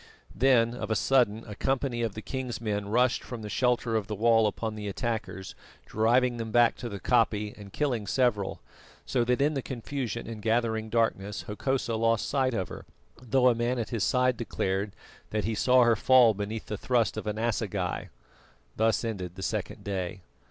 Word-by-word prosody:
Then 120 Hz, -1 st, +4 dB
of 120 Hz, -, -5 dB
a 110 Hz, -, +1 dB
sudden 115 Hz, -1 st, +2 dB
a 105 Hz, -, -8 dB
company 130 Hz, +1 st, -1 dB
of 115 Hz, -4 st, -2 dB
the 110 Hz, -, -6 dB
king's 130 Hz, -3 st, -4 dB
men 105 Hz, -3 st, -2 dB
rushed 125 Hz, +3 st, +2 dB
from 120 Hz, -3 st, -7 dB
the 105 Hz, -, -5 dB
shelter 125 Hz, -2 st, +1 dB
of 105 Hz, -3 st, 0 dB
the 105 Hz, -, -3 dB
wall 115 Hz, +1 st, +4 dB
upon 110 Hz, +1 st, -3 dB
the 105 Hz, -1 st, -6 dB
attackers 105 Hz, -2 st, -4 dB, 0.3 s
driving 120 Hz, +3 st, +2 dB
them 115 Hz, -1 st, -4 dB
back 120 Hz, +1 st, +4 dB
to 120 Hz, -, -5 dB
the 100 Hz, -2 st, -6 dB
koppie 105 Hz, -2 st, +1 dB
and 100 Hz, -2 st, -11 dB
killing 120 Hz, -7 st, -1 dB
several, 105 Hz, -3 st, 0 dB, 0.4 s
so 125 Hz, -2 st, +1 dB
that 125 Hz, +2 st, +1 dB
in 150 Hz, +2 st, +2 dB
the 135 Hz, -, -2 dB
confusion 125 Hz, -1 st, -4 dB
and 115 Hz, -2 st, -7 dB
gathering 110 Hz, 0 st, 0 dB
darkness 105 Hz, -3 st, 0 dB
Hokosa 120 Hz, +3 st, -2 dB
lost 115 Hz, -1 st, +1 dB
sight 130 Hz, -3 st, +1 dB
of 95 Hz, -4 st, -2 dB
her, -, -, -9 dB, 0.3 s
though 125 Hz, +1 st, +3 dB
a -, -, +4 dB
man 120 Hz, +2 st, -1 dB
at 115 Hz, -, -3 dB
his 115 Hz, -5 st, -1 dB
side 125 Hz, +1 st, +2 dB
declared 100 Hz, -3 st, -2 dB, 0.3 s
that 110 Hz, -1 st, -1 dB
he 110 Hz, -, 0 dB
saw 125 Hz, +3 st, +4 dB
her 120 Hz, -1 st, +4 dB
fall 120 Hz, 0 st, +6 dB
beneath 105 Hz, +2 st, -4 dB
the 105 Hz, -, -4 dB
thrust 120 Hz, -5 st, +1 dB
of 110 Hz, 0 st, -5 dB
an 105 Hz, 0 st, -2 dB
assegai. 105 Hz, -5 st, -2 dB, 0.7 s
Thus 110 Hz, 0 st, +2 dB
ended 95 Hz, -6 st, -4 dB
the 95 Hz, -, -7 dB
second -, -, -3 dB
day. 95 Hz, -2 st, -4 dB
115 Hz, 190 wpm, -28 LUFS, 105-125 Hz, 0.7 s, fall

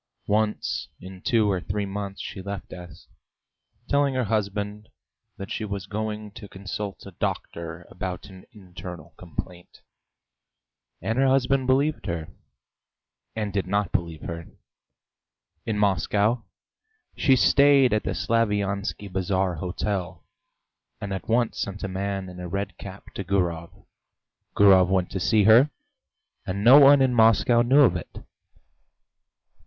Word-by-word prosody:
Once 105 Hz, +1 st, -1 dB
in 95 Hz, 0 st, -11 dB
two 110 Hz, -4 st, +2 dB
or 95 Hz, -2 st, -1 dB
three 100 Hz, +3 st, -3 dB
months 100 Hz, 0 st, -5 dB
she 95 Hz, -, -6 dB
left 100 Hz, 0 st, -7 dB
S, 90 Hz, -4 st, -11 dB, 0.8 s
telling 140 Hz, -1 st, +2 dB
her 130 Hz, -, +1 dB
husband 105 Hz, 0 st, -2 dB, 0.5 s
that 100 Hz, -, -8 dB
she -, -, -3 dB
was 100 Hz, -2 st, -4 dB
going 105 Hz, 0 st, -4 dB
to 105 Hz, 0 st, -11 dB
consult 100 Hz, +1 st, -6 dB
a 100 Hz, -, -9 dB
doctor 85 Hz, 0 st, -5 dB
about 90 Hz, 0 st, -6 dB
an 95 Hz, -1 st, -13 dB
internal 90 Hz, -5 st, -10 dB
complaint 90 Hz, +1 st, -9 dB, 1.2 s
and 115 Hz, +3 st, -1 dB
her 135 Hz, -, +4 dB
husband 135 Hz, 0 st, +2 dB
believed 140 Hz, -3 st, +1 dB
her, 85 Hz, -3 st, -4 dB, 1.1 s
and 105 Hz, -2 st, -3 dB
did 100 Hz, -2 st, -1 dB
not 100 Hz, 0 st, 0 dB
believe 85 Hz, -3 st, -3 dB
her. 85 Hz, 0 st, -6 dB, 1.2 s
In 110 Hz, -2 st, -1 dB
Moscow 105 Hz, +3 st, +1 dB, 0.7 s
she 135 Hz, -3 st, +4 dB
stayed 140 Hz, -1 st, +5 dB
at 105 Hz, -, +2 dB
the -, -, -3 dB
Slaviansky 105 Hz, -3 st, -1 dB
Bazaar 95 Hz, -1 st, -1 dB
hotel, 90 Hz, +2 st, -4 dB, 0.7 s
and 100 Hz, -1 st, -5 dB
at 95 Hz, +2 st, -6 dB
once 120 Hz, 0 st, +1 dB
sent 100 Hz, +1 st, -4 dB
a -, -, -1 dB
man 95 Hz, 0 st, -3 dB
in 90 Hz, 0 st, -10 dB
a 90 Hz, -, -5 dB
red 100 Hz, 0 st, -4 dB
cap 100 Hz, 0 st, -10 dB
to 100 Hz, -, -5 dB
Gurov. 85 Hz, -3 st, -2 dB, 0.7 s
Gurov 95 Hz, -3 st, +6 dB
went 95 Hz, -2 st, 0 dB
to 95 Hz, -, -3 dB
see 105 Hz, +3 st, +3 dB
her, 115 Hz, +8 st, +6 dB, 0.8 s
and 100 Hz, +2 st, -3 dB
no 130 Hz, +5 st, +9 dB
one 140 Hz, -1 st, +7 dB
in 130 Hz, -1 st, +2 dB
Moscow 115 Hz, +1 st, +4 dB
knew 130 Hz, +5 st, +5 dB
of 135 Hz, -, +5 dB
it. -, -, -7 dB
100 Hz, 140 wpm, -25 LUFS, 95-110 Hz, 1.2 s, no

